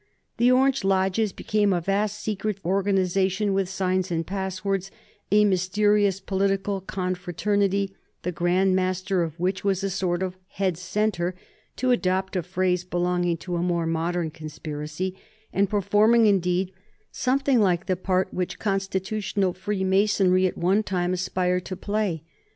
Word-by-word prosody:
The 245 +2 +4
Orange 265 -1 +3
lodges 195 +2 +1
became 205 +1 0
a 180 - +2
vast 200 +4 -1
secret 210 -1 -2
organization 195 +1 +1
with 190 -1 0
signs 185 -1 0
and 165 -1 -1
passwords, 190 0 -2 0.4
a 210 +1 +5
mysterious 200 +1 +2
political 195 0 -1
confraternity, 190 +2 -1 0.3
the 180 - -1
Grand 180 +3 +2
Master 185 0 0
of 165 -1 -4
which 185 +2 -1
was 195 -1 0
a 195 - -1
sort 185 -1 -1
of 185 0 -4
head 185 -2 -1
centre, 180 0 -1 0.4
to 255 -1 +1
adopt 190 -4 0
a 180 - +1
phrase 180 0 0
belonging 175 -1 0
to 175 +1 -4
a - - -1
more 170 -1 0
modern 165 0 -1
conspiracy, 155 +3 -5 0.4
and 200 0 +2
performing, 210 +3 +4
indeed, 185 -2 +2 0.4
something 270 0 +2
like 185 -4 +2
the 185 - +1
part 185 +1 0
which 180 -1 -2
Continental 195 -1 -1
Freemasonry 190 -1 +2
at - - -5
one 190 +5 +2
time 180 -3 -1
aspired 180 0 0
to 185 - -4
play. 200 -5 -2
190 Hz, 140 wpm, -25 LUFS, 180-200 Hz, 0.4 s, a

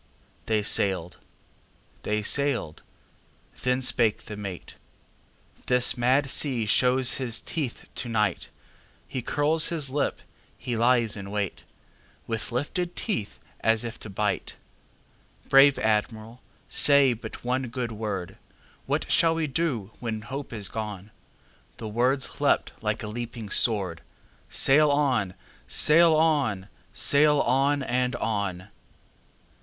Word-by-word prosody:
They 110 -2 +1
sailed. 95 -4 +1 0.8
They 105 0 -2
sailed. 125 - 0 0.8
Then 125 +1 0
spake 115 -4 +2
the 105 - -7
mate:"This 105 +5 -4
mad 130 +4 +2
sea 130 -4 0
shows 125 +4 +2
his 120 -4 0
teeth 145 -8 -5
to 120 - -4
night. 105 -2 -1 0.6
He 130 - -4
curls 150 +5 +2
his 150 -6 -1
lip, 145 +1 -2 0.3
he 120 - -4
lies 115 -1 +2
in 100 -1 -8
wait, 100 -2 -4 0.6
With 115 0 -3
lifted 170 +8 -3
teeth, 155 - -3 0.2
as 115 0 +2
if 120 0 -7
to 105 - -5
bite! 105 +1 -2 0.9
Brave 135 +1 +6
Admiral, 110 +2 -2 0.3
say 140 -3 +5
but 110 -1 -9
one 125 +1 -1
good 120 0 -4
word:What 105 -5 -6
shall 165 -1 +4
we 165 -1 -1
do 130 - -2
when 110 -3 -4
hope 135 +6 -7
is 105 -4 -3
gone?"The 105 +1 -10
words 125 +5 -1
leapt - - +2
like - - -2
a - - -5
leaping 115 -1 -6
sword:"Sail 115 - +1
on! 130 -10 +1 0.3
sail 160 - +5
on! 140 -12 +1 0.2
sail 150 +6 +3
on! 140 +3 +1
and 125 -1 -1
on!" 100 -5 -3
120 Hz, 115 wpm, -26 LUFS, 105-140 Hz, 0.9 s, Brave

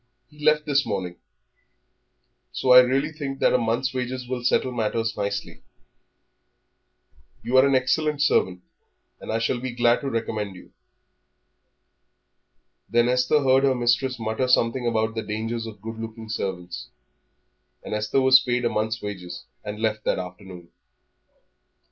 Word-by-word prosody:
He 150 0 -15
left 150 0 +3
this 145 -1 +2
morning. 95 -5 -4 1.3
So 130 - 0
I 125 - +11
really 135 +4 +2
think 140 -3 -5
that - - +2
a 125 - +4
month's 120 +3 -1
wages 125 0 -4
will 125 -1 -4
settle 130 +1 +1
matters 115 -1 -1
nicely. 100 0 -4 1.8
You 120 +3 -2
are 130 +1 +6
an 140 - +2
excellent 145 +3 +1
servant, 90 -10 +1 0.6
and - - -6
I 110 - +1
shall 115 +2 -1
be 130 0 -5
glad 120 0 +3
to 140 - -3
recommend 110 -4 -3
you." 90 - -15 2.2
Then 120 +1 +3
Esther 125 +4 +2
heard 135 0 +4
her 135 -1 +3
mistress 125 +2 +1
mutter 110 +3 -2
something 120 0 +2
about 110 -1 0
the 110 - -3
danger 110 +2 -3
of 110 - -14
good 115 0 -7
looking 110 0 -8
servants. 90 -4 -5 0.9
And - - -6
Esther 105 +5 0
was 130 0 +7
paid 125 -1 -1
a - - +3
month's 110 +1 -2
wages, 95 -4 -6 0.2
and 105 0 -6
left 110 -1 -1
that - - +1
afternoon. 90 -1 -9
120 Hz, 150 wpm, -24 LUFS, 110-130 Hz, 2.2 s, I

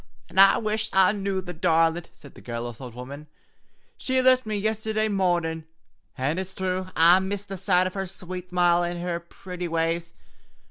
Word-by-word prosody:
"Och! - - -28
An' 185 - -1
I 195 0 +8
wish 215 0 -2
I 190 0 +5
knew, 195 -2 -2
the 180 -1 -7
darlint!" 165 +1 +1
said 140 - -15
the - - -14
garrulous 120 0 -6
old 125 -3 -9
woman. 140 +4 -9 0.7
"She 260 0 0
lift 255 -2 +4
me 215 -1 -1
yistherday 220 +1 -1
marnin', 175 -4 0 0.5
an' 145 +6 -1
it's 190 0 -6
thrue 185 0 -2
I 170 +3 +6
miss 195 +1 -3
the 195 -1 -6
sight 185 -1 +2
o' 185 - -2
her 195 0 -4
sweet 185 0 -7
smile 175 -1 +3
an' 175 0 -3
her 170 -1 -2
pretty 180 +1 -7
ways. 165 +1 -1
180 Hz, 185 wpm, -25 LUFS, 165-195 Hz, 0.7 s, I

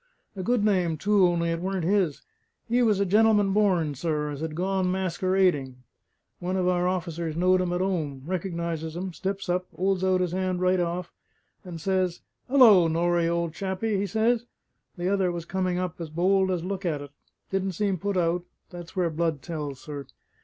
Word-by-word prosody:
"A 190 - -4
good 230 +1 +1
name 180 -6 +2
too; 200 +2 +4
only 170 -1 0
it 165 - -2
weren't 190 -1 -2
his. 180 -4 +1 0.4
He 240 +2 +2
was 215 -4 +3
a 200 - +2
gen'lem'n 210 0 +4
born, 185 -8 +2
sir, 150 +1 -2
as 145 0 -6
had 160 -1 -4
gone 190 +2 0
maskewerading. 185 -6 +1 0.6
One 185 +2 -2
of 180 -1 +1
our 180 0 +2
officers 170 -3 -2
knowed 185 +2 +3
him 180 -1 -1
at 175 +1 0
'ome, 155 -8 -2
reckonises 170 -3 -3
him, 185 +1 -4
steps 195 +3 -4
up, 180 +1 -1
'olds 190 0 0
out 185 -1 +2
his 180 -1 -1
'and 185 -1 -1
right 185 0 +2
off, 175 +1 -2 0.5
and 175 -3 -7
says 185 0 0 0.3
he: 270 - -2
''Ullo, 210 -11 +7
Norrie, 170 +1 +1
old 170 -1 -1
chappie!' 195 +3 -2
he 200 +1 -1
says. 225 +4 +1 0.5
The 175 +1 -2
other 190 -2 +2
was 170 -1 -5
coming 185 0 -1
up, 180 -1 -3
as 165 - -5
bold 190 +4 +2
as 180 -3 -1
look 195 +1 -4
at 155 -5 -1
it; 145 - -11 0.4
didn't 195 0 -1
seem 195 0 -1
put 200 +1 -1
out 175 0 +1 0.3
that's 175 -2 -10
where 175 -3 +1
blood 160 -3 -1
tells, 150 -5 -5
sir! 145 -2 -7
180 Hz, 190 wpm, -26 LUFS, 170-190 Hz, 0.6 s, Ullo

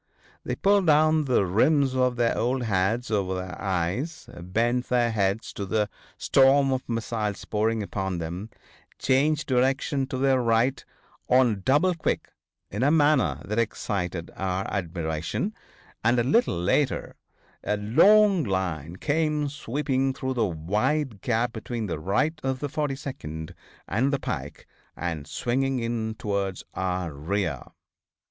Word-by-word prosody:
They - - -2
pulled 200 -2 +3
down 155 0 +4
the 125 -7 +2
rims 130 - +3
of 125 -1 +2
their 120 -1 +1
old 125 +2 0
hats 110 +3 0
over 95 -3 0
their 90 -1 -6
eyes, 95 - -2
bent 115 +7 0
their 120 -2 +2
heads 100 0 -1
to 100 - -4
the 105 +1 0 0.3
storm 135 +1 +4
of 130 - -1
missiles 110 -3 -2
pouring 110 +1 0
upon 95 -2 -3
them, 85 +6 -5 0.5
changed 145 +3 +2
direction 135 +1 +1
to 130 - -4
their 130 -1 +3
right 115 +3 +2 0.5
on 125 -6 +4
double 150 - +3
quick 165 - -2 0.4
in 105 - -3
a 135 - +4
manner 145 - +3
that 105 +4 -1
excited 90 -6 -2
our 95 0 -2
admiration, 85 - -2 0.5
and 120 +3 +3
a 120 - +3
little 130 - +2
later 125 +10 0 0.5
a 105 - 0
long 185 - +5
line 90 - -2
came 150 - 0
sweeping 135 -1 -1
through 130 0 -2
the 115 -4 +1
wide 105 - -1
gap 120 0 0
between 115 0 -4
the 85 -6 -3
right 150 - 0
of 130 0 -1
the 145 +2 -4
42d 135 - -4 0.3
and 125 +8 +1
the 140 - 0
pike, 70 - -5 0.3
and 80 -4 -4
swinging 135 +2 -1
in 115 -2 -2
towards 100 -3 -2
our 90 -3 -2
rear. 80 -1 -2
115 Hz, 140 wpm, -26 LUFS, 95-135 Hz, 0.5 s, long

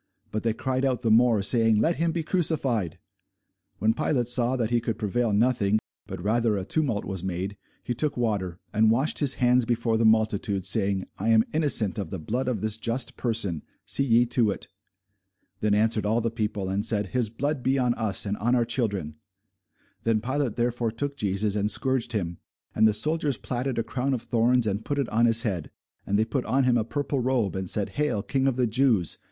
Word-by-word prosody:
But 110 - -2
they 115 -1 0
cried 130 +3 -2
out 130 -2 0
the 115 - +2
more, 115 -2 +4
saying, 115 0 +3
Let 165 +8 +1
him 165 0 +1
be 165 0 -2
crucified. 140 - 0 0.8
When 110 +3 +2
Pilate 125 +1 0
saw 125 +1 +2
that 120 -3 -1
he 120 -1 +2
could 115 -1 -3
prevail 110 +2 0
nothing, 105 -1 +2 0.3
but 95 -3 -6
that 85 - -9
rather 110 0 +1
a 95 - -4
tumult 130 -6 -1
was 95 -3 -5
made, 95 +2 -3 0.3
he 120 - -2
took 145 +4 -1
water, 100 -7 -1 0.2
and 110 +1 +4
washed 130 +7 +1
his 140 -3 +2
hands 125 0 +3
before 115 -1 0
the - - +2
multitude, 110 -3 +1
saying, 100 -1 +1 0.2
I 105 +4 -1
am 110 -1 +5
innocent 130 - +1
of 95 -5 -4
the 95 - -4
blood 120 +10 -3
of 120 -6 -1
this 110 0 0
just 115 +3 -2
person: 105 - -1 0.2
see 140 - +1
ye 120 -2 +4
to 120 -2 +2
it. 100 - -5 0.9
Then 105 0 +2
answered 110 -1 +1
all 110 +2 +2
the 115 -1 -1
people, 105 -3 -3
and 95 +2 -1
said, 105 -3 +1
His 120 -2 -1
blood 145 +5 -2
be 135 +2 +1
on 125 -2 +2
us, 110 -4 0
and 100 0 -1
on 120 +4 +1
our 120 -2 +2
children. 100 - -2 0.8
Then 115 -1 +1
Pilate 130 0 -2
therefore 120 -1 -1
took 140 +5 -4
Jesus, 100 -3 -1
and 105 0 0
scourged 130 -1 -1
him. 85 -5 -3 0.3
And 110 +1 +4
the 105 - +1
soldiers 150 +4 0
platted 125 +1 -3
a 115 - +1
crown 130 +4 -1
of 120 - -6
thorns, 120 +1 +2
and 105 +1 -2
put 145 - -3
it 140 -4 -1
on 115 +2 +3
his 115 +1 +3
head, 95 -9 -3 0.4
and 100 - +1
they 110 - +2
put 130 +2 -2
on 130 +4 +1
him 125 -1 +3
a - - 0
purple 140 +3 -2
robe, 125 -6 0
and 95 -1 -3
said, 105 -2 +1
Hail, 150 -9 -1
King 135 -1 0
of 135 - +1
the 125 -1 +1
Jews! 115 - +2
115 Hz, 215 wpm, -26 LUFS, 105-125 Hz, 0.9 s, am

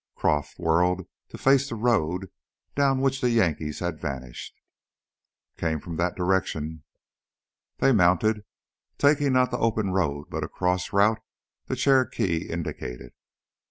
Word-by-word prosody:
Croff 75 -1 0
whirled 90 +2 +1 0.2
to - - -9
face 140 +1 +3
the - - -4
road 95 -6 0 0.4
down 135 -2 +2
which 135 0 +1
the 125 - +2
Yankees 80 -10 0
had 90 -3 -3
vanished. 65 -4 -6 1.0
"Came 80 -2 -1
from 85 +2 -7
that 85 +1 0
direction 80 -4 -1 0.5
" - - -66
They 135 - +5
mounted, 105 +1 +3 0.5
taking 145 -1 +3
not 130 0 +3
the - - -2
open 110 -4 +1
road 75 -6 -1
but - - -3
a - - -4
cross 90 0 -1
route 105 +3 +3 0.5
the - - -2
Cherokee 120 - +1
indicated. 60 -7 -5
95 Hz, 135 wpm, -26 LUFS, 80-120 Hz, 1.0 s, They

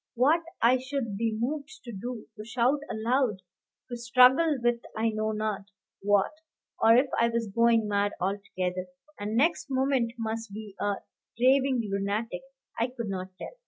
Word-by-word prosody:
What 290 +8 +4 0.2
I 250 +2 +5
should 260 -5 -3
be 220 +1 -1
moved 285 +5 -3
to 240 - -7
do, 230 +3 -6
to 215 - -8
shout 245 +5 +1
aloud, 230 -2 0 0.4
to 245 - -5
struggle 255 +6 +5
with 240 0 +1 0.2
I 225 +1 +2
know 215 0 -1
not 215 -2 -2 0.4
what; 205 -1 +3 0.5
or 225 +1 +7
if 255 +3 +5
I 235 - +4
was 230 0 -1
going 230 -1 +4
mad 205 0 +1
altogether, 185 -1 -2 0.3
and 210 +2 -2
next 310 +2 +2
moment 260 -3 +1
must 225 -1 -4
be 210 -2 -8
a 205 0 0 0.4
raving 260 -2 +3
lunatic, 200 0 -2 0.4
I 230 - +2
could 240 -4 -6
not 185 -1 -3
tell. - - -8
230 Hz, 160 wpm, -28 LUFS, 210-255 Hz, 0.5 s, or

